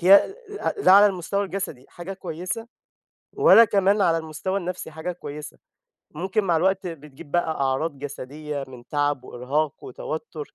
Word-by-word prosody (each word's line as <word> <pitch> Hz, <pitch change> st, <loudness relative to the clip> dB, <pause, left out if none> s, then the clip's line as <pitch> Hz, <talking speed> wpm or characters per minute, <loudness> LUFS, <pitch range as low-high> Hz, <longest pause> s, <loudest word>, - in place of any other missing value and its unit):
هي 195 Hz, -, +6 dB, 0.4 s
ل -, -, -4 dB
لا -, -, +8 dB
على 205 Hz, +1 st, +9 dB
المستوى 200 Hz, +1 st, -1 dB
الجسدي 185 Hz, -9 st, -5 dB
حاجة 175 Hz, +2 st, -7 dB
كويسة 185 Hz, +4 st, -5 dB, 0.7 s
ولا 230 Hz, -, +7 dB
كمان 200 Hz, 0 st, +3 dB
على 165 Hz, -3 st, +4 dB
المستوى 160 Hz, +4 st, -3 dB
النفسي 180 Hz, -2 st, -5 dB
حاجة 160 Hz, +3 st, -4 dB
كويسة. 150 Hz, -4 st, -8 dB, 0.6 s
ممكن 190 Hz, +6 st, -1 dB
مع 170 Hz, -3 st, +2 dB
الوقت 190 Hz, +3 st, +1 dB
بتجيب 150 Hz, -4 st, -9 dB
بقى 175 Hz, 0 st, +1 dB
أعراض 135 Hz, +3 st, 0 dB
جسدية 145 Hz, +1 st, -6 dB
من 125 Hz, -2 st, -12 dB
تعب 145 Hz, -3 st, 0 dB
وإرهاق 140 Hz, +5 st, -2 dB
وتوتر 155 Hz, +3 st, -6 dB
165 Hz, 150 wpm, -24 LUFS, 145-190 Hz, 0.7 s, على